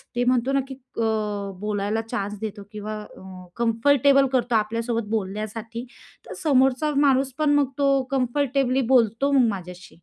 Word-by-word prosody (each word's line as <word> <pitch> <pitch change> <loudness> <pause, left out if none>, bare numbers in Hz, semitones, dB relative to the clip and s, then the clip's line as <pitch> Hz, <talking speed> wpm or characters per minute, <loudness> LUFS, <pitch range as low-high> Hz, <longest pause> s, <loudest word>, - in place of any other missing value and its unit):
ते 245 - +1
म्हणतो 250 +1 +2
ना 275 - +3
की 265 - -8 0.2
अ, - - 0 0.6
बोलायला 210 +1 -1
चान्स 210 -3 -4
देतो 210 -2 -5
किंवा 215 0 -5 0.2
अ, - - -13 0.4
कम्फर्टेबल 275 +4 +3
करतो 245 -2 +1
आपल्यासोबत 230 +1 -1
बोलण्यासाठी, 220 +3 -4 0.4
तर - - -8
समोरचा 270 +1 +3
माणूस 270 -2 +3
पण 305 -1 +3
मग 290 -2 +3
तो 280 - +3 0.2
कम्फर्टेबली 270 0 +1
बोलतो 240 +4 +3
मग 260 -4 +4
माझ्याशी. 180 -2 -7
235 Hz, 145 wpm, -24 LUFS, 215-270 Hz, 0.6 s, मग